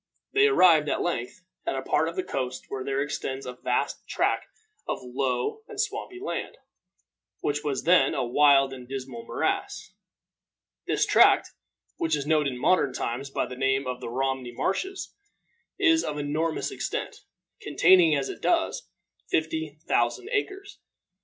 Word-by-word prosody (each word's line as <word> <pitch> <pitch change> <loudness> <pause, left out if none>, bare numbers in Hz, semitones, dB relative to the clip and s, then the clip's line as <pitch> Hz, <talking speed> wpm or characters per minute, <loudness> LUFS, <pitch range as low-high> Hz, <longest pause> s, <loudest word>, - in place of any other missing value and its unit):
They 415 +1 +5
arrived, 170 - +5
at - - 0
length, 170 -2 -3 0.2
at - - -2
a 135 - -3
part 150 +4 +1
of 165 - -8
the 185 - -1
coast 130 -1 -4
where 130 - -4
there 135 +1 0
extends 135 -2 -4
a 125 - -5
vast 125 0 -2
tract - - 0 0.4
of - - -1
low 125 - -2
and 430 -3 -9
swampy 420 -3 -3
land, 410 - -4 0.8
which 145 0 -1
was 140 -3 -2
then 170 -5 +4
a - - 0
wild 135 +1 +4
and 125 -2 -10
dismal 130 -3 -6
morass. - - -2 0.9
This - - +2
tract, - - +5 0.5
which 160 -1 +1
is 145 -2 -3
known 150 -1 +2
in 130 -2 -3
modern 140 -1 +2
times 125 +3 -3
by - - -1
the 125 - -8
name 135 +1 +1
of 125 -1 -4
the - - -5
Romney 130 0 -2
Marshes, 380 - -2 0.6
is 325 0 +4
of 150 - -3
enormous 155 +3 -1
extent, - - -4 0.4
containing, 175 -5 +5
as 135 -1 -1
it - - -7
does, 345 +8 0 0.4
fifty 160 -1 -1
thousand 120 0 +1
acres. 400 -1 -3
145 Hz, 155 wpm, -26 LUFS, 130-170 Hz, 0.9 s, They